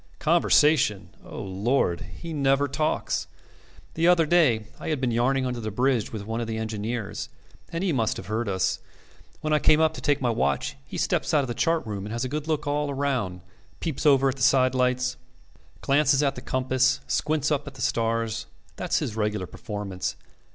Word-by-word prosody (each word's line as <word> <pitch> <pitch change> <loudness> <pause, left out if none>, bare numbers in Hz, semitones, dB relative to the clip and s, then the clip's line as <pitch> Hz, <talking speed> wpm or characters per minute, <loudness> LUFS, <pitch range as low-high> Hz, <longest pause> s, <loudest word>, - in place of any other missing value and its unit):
Conversation! 150 - +3
O - - -8
Lord! 95 -1 0
He 170 -1 -8
never 140 -1 +2
talks. 150 +3 -1 0.7
The 165 +2 +2
other 175 -2 +5
day 150 -10 +3
I - - -7
had 155 -3 0
been 125 -2 0
yarning 130 +3 +1
under 125 -1 -2
the 110 -1 -3
bridge 125 +1 +1
with 105 -3 -6
one 115 +2 -3
of 115 - -3
the 110 0 -3
engineers, 110 0 -4 0.4
and 170 +2 -2
he 185 -4 +1
must 115 -4 0
have - - -7
heard 110 +2 -2
us. 95 -1 0 0.6
When 155 -1 0
I 150 - +4
came 155 - +5
up 160 0 +3
to - - -8
take 145 -1 +2
my 125 -3 +1
watch, 70 -9 0
he - - -7
steps - - 0
out 145 - +4
of - - -4
the 120 - -2
chart 165 +5 +1
room 105 -2 -5
and 105 - -6
has 120 +2 -2
a - - -3
good 150 +2 -4
look 155 -2 -1
all 145 0 0
round, 130 -10 -1 0.4
peeps 160 -6 -3
over 135 -1 +5
at 135 0 -1
the - - -8
sidelights, 125 0 +2 0.6
glances 140 0 +3
at 140 - +2
the - - -8
compass, 130 +1 +1
squints 150 0 0
upward 145 -1 0
at 140 - -7
the 130 - -9
stars. 115 0 -1 0.3
That's - - 0
his 110 - -2
regular 105 -3 -1
performance. 95 -3 -5
130 Hz, 195 wpm, -26 LUFS, 110-145 Hz, 0.7 s, other